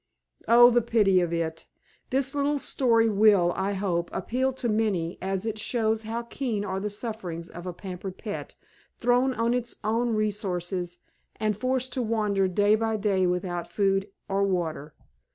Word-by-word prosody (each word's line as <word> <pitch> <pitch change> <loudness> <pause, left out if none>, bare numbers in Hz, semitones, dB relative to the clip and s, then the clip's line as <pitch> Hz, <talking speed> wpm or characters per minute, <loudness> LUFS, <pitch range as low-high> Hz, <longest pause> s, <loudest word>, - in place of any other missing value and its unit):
Oh, 240 +1 +8
the 240 0 +4
pity 215 -5 +3
of 175 -1 -1
it! 165 -1 -3 0.4
This 270 +1 0
little 290 0 +1
story 230 -5 +2
will, 200 -4 +4
I 195 +1 -1
hope, 180 -3 -1
appeal 260 +2 -1
to 250 -1 -3
many, 210 -7 0
as 190 +1 -2
it 220 -1 -3
shows 220 -1 0
how 225 +2 -4
keen 235 -4 -3
are 190 -1 -2
the 210 +2 -2
sufferings 200 -6 -5
of 175 +1 -8
a - - -2
pampered 185 +1 -7
pet, 210 -3 -6 0.4
thrown 245 +2 +2
on 230 +1 +1
its 245 -1 -2
own 230 +2 +1
resources 185 -4 -2 0.4
and 215 -1 0
forced 255 +3 -1
to 255 - -1
wander 210 -4 +1
day 205 +3 +3
by 220 0 +1
day 195 -3 +1
without 180 -1 -2
food 195 0 +1 0.2
or 195 0 0
water. 165 -6 -1
210 Hz, 165 wpm, -27 LUFS, 185-230 Hz, 0.4 s, Oh